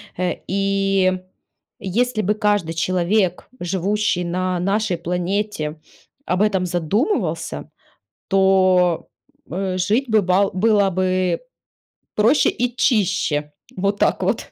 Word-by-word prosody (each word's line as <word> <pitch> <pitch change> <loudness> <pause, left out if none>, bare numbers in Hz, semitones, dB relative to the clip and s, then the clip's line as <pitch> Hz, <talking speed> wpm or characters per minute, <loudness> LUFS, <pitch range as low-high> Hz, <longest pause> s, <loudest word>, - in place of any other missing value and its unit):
Э, 180 0 -1
и, 195 -1 +1 0.7
если 225 +4 0
бы 210 +2 0
каждый 205 -6 0
человек, 180 +2 0
живущий 190 +1 0
на 180 +1 -1
нашей 195 0 0
планете, 180 -2 -2 0.5
об 185 +3 +1
этом 190 -4 +1
задумывался, 190 - -1 0.6
то, 185 -3 +3 0.4
э, 185 +1 -2
жить 210 +9 +1
бы 220 -1 +4
бал 190 +1 +2
было 205 0 +3
бы 185 0 0 0.7
проще 225 +8 +4
и 245 0 -2
чище. 185 - +1 0.3
Вот 200 +2 0
так - - +1
вот. - - -2
190 Hz, 110 wpm, -21 LUFS, 180-210 Hz, 0.7 s, бы